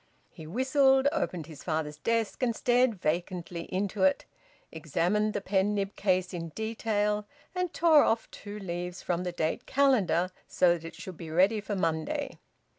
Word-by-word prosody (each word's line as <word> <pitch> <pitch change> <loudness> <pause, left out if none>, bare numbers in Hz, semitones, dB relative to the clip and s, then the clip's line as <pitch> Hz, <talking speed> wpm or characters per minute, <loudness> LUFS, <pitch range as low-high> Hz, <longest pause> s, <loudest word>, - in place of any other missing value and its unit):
He 160 -3 -11
whistled, 265 - +3
opened 185 - -2
his 155 -2 -11
father's 155 -3 -2
desk 230 - -1
and 235 -3 +1
stared 245 -1 +3
vacantly 170 +1 -3
into 195 +1 -2
it, 190 0 +3 0.5
examined 175 +7 0
the 205 - -2
pen 195 +1 +1
nib 200 0 -2
case 185 -2 0
in 165 -1 -4
detail, 210 -2 -1 0.3
and 360 -2 -1
tore 320 -3 +5
off 225 0 +1
two 205 0 -8
leaves 180 -2 -5
from 175 0 -1
the 180 - -1
date 165 +7 -2
calendar 195 - +2 0.2
so 175 -1 +4
that 165 -1 -6
it 165 - -8
should 185 -3 -9
be 165 -2 -8
ready 190 +7 +3
for 205 0 -3
Monday. 160 -4 -2
190 Hz, 165 wpm, -29 LUFS, 170-225 Hz, 0.5 s, tore